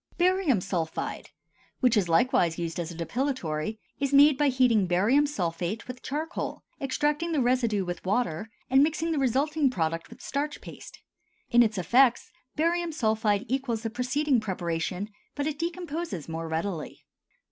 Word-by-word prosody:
BARIUM 355 Hz, -, +3 dB
SULPHIDE, 170 Hz, -4 st, -3 dB, 0.5 s
which 250 Hz, -3 st, +3 dB
is 195 Hz, -5 st, +2 dB
likewise 165 Hz, -2 st, +3 dB
used 170 Hz, -1 st, -3 dB
as 170 Hz, -2 st, -3 dB
a 170 Hz, -, -8 dB
depilatory, 215 Hz, -, -2 dB, 0.2 s
is 275 Hz, -1 st, 0 dB
made 290 Hz, +1 st, +7 dB
by 295 Hz, +2 st, +2 dB
heating 250 Hz, -7 st, +3 dB
barium 220 Hz, +12 st, +3 dB
sulphate 180 Hz, -, -3 dB
with 250 Hz, 0 st, -7 dB
charcoal, 310 Hz, +5 st, -4 dB, 0.2 s
extracting 295 Hz, +4 st, 0 dB
the 305 Hz, -, +2 dB
residue 240 Hz, -6 st, +1 dB
with 175 Hz, -1 st, -5 dB
water, 200 Hz, -1 st, -1 dB, 0.2 s
and 265 Hz, +1 st, +5 dB
mixing 320 Hz, +2 st, +1 dB
the 310 Hz, -, 0 dB
resulting 275 Hz, +3 st, +2 dB
product 165 Hz, -6 st, -2 dB
with -, -, -13 dB
starch 295 Hz, +2 st, -3 dB
paste. -, -, -12 dB, 0.5 s
In 240 Hz, 0 st, +6 dB
its 215 Hz, -3 st, +2 dB
effects 245 Hz, +7 st, +3 dB, 0.2 s
barium 340 Hz, +2 st, +1 dB
sulphide 220 Hz, -5 st, +1 dB
equals 250 Hz, -4 st, -1 dB
the 225 Hz, -, -3 dB
preceding 255 Hz, +3 st, +1 dB
preparation, 180 Hz, -1 st, -3 dB, 0.3 s
but 285 Hz, -, -2 dB
it 300 Hz, -1 st, -3 dB
decomposes 335 Hz, -, -4 dB
more 165 Hz, 0 st, -4 dB
readily. 160 Hz, 0 st, -4 dB
245 Hz, 150 wpm, -27 LUFS, 180-290 Hz, 0.5 s, made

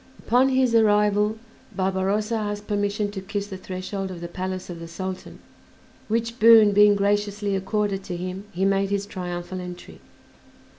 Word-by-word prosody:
Upon 250 Hz, +3 st, +4 dB
his 260 Hz, -2 st, +2 dB
arrival 210 Hz, -1 st, +3 dB, 0.4 s
Barbarossa 195 Hz, +3 st, 0 dB
asked 205 Hz, -2 st, -3 dB
permission 205 Hz, 0 st, -1 dB
to 195 Hz, -2 st, -6 dB
kiss 200 Hz, +1 st, -4 dB
the 200 Hz, -2 st, -8 dB
threshold 190 Hz, +1 st, -5 dB
of 180 Hz, -2 st, -7 dB
the 170 Hz, -, -6 dB
palace 185 Hz, +1 st, -5 dB
of 175 Hz, -2 st, -7 dB
the 165 Hz, -, -8 dB
Sultan, 185 Hz, +2 st, -6 dB, 0.7 s
which 230 Hz, +2 st, -2 dB
boon 225 Hz, -2 st, +8 dB
being 205 Hz, 0 st, +6 dB
graciously 205 Hz, 0 st, 0 dB
accorded 195 Hz, 0 st, -1 dB
to 175 Hz, -, -4 dB
him, 185 Hz, +2 st, -5 dB
he 185 Hz, +3 st, -1 dB
made 195 Hz, 0 st, +1 dB
his 200 Hz, 0 st, -1 dB
triumphal 180 Hz, -1 st, -5 dB
entry. 180 Hz, 0 st, -10 dB
200 Hz, 155 wpm, -24 LUFS, 185-210 Hz, 0.7 s, boon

